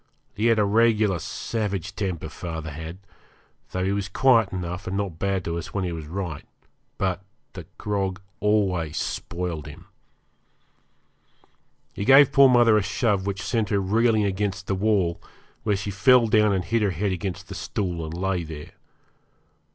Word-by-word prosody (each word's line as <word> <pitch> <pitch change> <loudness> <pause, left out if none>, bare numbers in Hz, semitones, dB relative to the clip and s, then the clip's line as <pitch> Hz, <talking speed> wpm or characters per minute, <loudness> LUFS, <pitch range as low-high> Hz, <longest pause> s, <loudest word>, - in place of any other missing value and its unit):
He 110 +3 0
had 115 -1 +4
a 105 - +3
regular 105 -3 +3
savage 100 0 -3
temper, 90 -6 -3
father 80 -1 -6
had, 80 +4 -7 0.7
though 95 0 -2
he 95 - +1
was 100 -1 -2
quiet 115 -5 +4
enough 90 +1 -5
and 95 +1 -2
not 95 -5 -3
bad 95 -2 -1
to 85 0 -2
us 85 - -9
when 100 - 0
he 90 - -2
was 80 -3 -6
right. 85 -3 -5 0.5
But 95 -1 -1 0.3
the - - -9
grog 100 -2 -2 0.2
always 95 -7 +1
spoiled 85 -3 -4
him. 75 - -11 2.1
He - - -4
gave 135 +4 +7
poor 140 -1 +7
mother 120 -3 +5
a - - +3
shove 100 -1 0
which 100 0 -3
sent 110 -4 -1
her 100 - +2
reeling 110 +3 +2
against 100 0 -2
the 100 - -1
wall, 95 -4 +1 0.4
where 105 - +1
she 100 +1 -4
fell 120 +5 +5
down 105 -1 +4
and 95 -2 0
hit 115 +3 +1
her 105 - +2
head 95 +3 -1
against 95 +1 -4
the - - -7
stool, 95 -3 -3
and 80 - -5
lay 95 -1 -1
there. 75 -2 -9
95 Hz, 165 wpm, -24 LUFS, 90-105 Hz, 2.1 s, gave